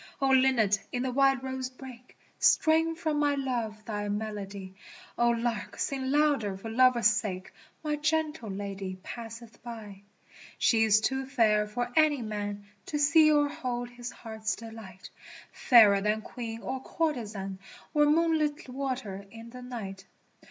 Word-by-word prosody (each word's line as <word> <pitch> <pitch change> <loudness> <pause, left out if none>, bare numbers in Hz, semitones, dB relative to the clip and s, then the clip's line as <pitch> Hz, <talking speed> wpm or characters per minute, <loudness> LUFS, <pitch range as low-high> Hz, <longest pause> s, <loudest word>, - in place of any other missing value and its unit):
O 270 -1 +2
Linnet 255 -7 +4
in 245 0 -2
the 260 - -1
wild 270 0 +3
rose 260 -1 -3
brake 255 -1 -13 0.2
Strain 325 +1 +4
for 320 -1 -2
my 295 -1 +2
Love 235 -6 -3
thy 205 -2 -3
melody, 205 -2 -5 0.4
O 240 0 +3
Lark 235 -2 -2
sing 265 -1 -2
louder 280 -9 +2
for 225 +3 -7
love's 250 0 +4
sake, 205 -5 -1 0.3
My 300 -1 -1
gentle 305 -5 -1
Lady 195 -1 -5
passeth 230 -1 -9
by. 215 -5 -9 0.3
' - - -28 0.2
She 225 -1 +3
is 215 0 +4
too 265 +3 -1
fair 215 -6 +2
for 245 +3 -3
any 300 -5 +4
man 205 -1 -4
' 195 - -38
To 300 - -2
see 310 +1 +5
or 295 -1 +4
hold 245 -3 -4
his 245 0 -7
heart's 220 -1 -4
delight, 220 -5 -11 0.6
lFairer 210 -5 +8
than 210 +1 0
Queen 230 -2 -7
or 260 0 -3
courtezan 215 - -3 0.2
| - - -22
Or 295 -1 +4
moonlit 310 -1 +1
water 250 -7 -4
in 230 +2 -11
the 250 +1 -9
night. 195 -6 -7
240 Hz, 155 wpm, -29 LUFS, 210-270 Hz, 0.6 s, lFairer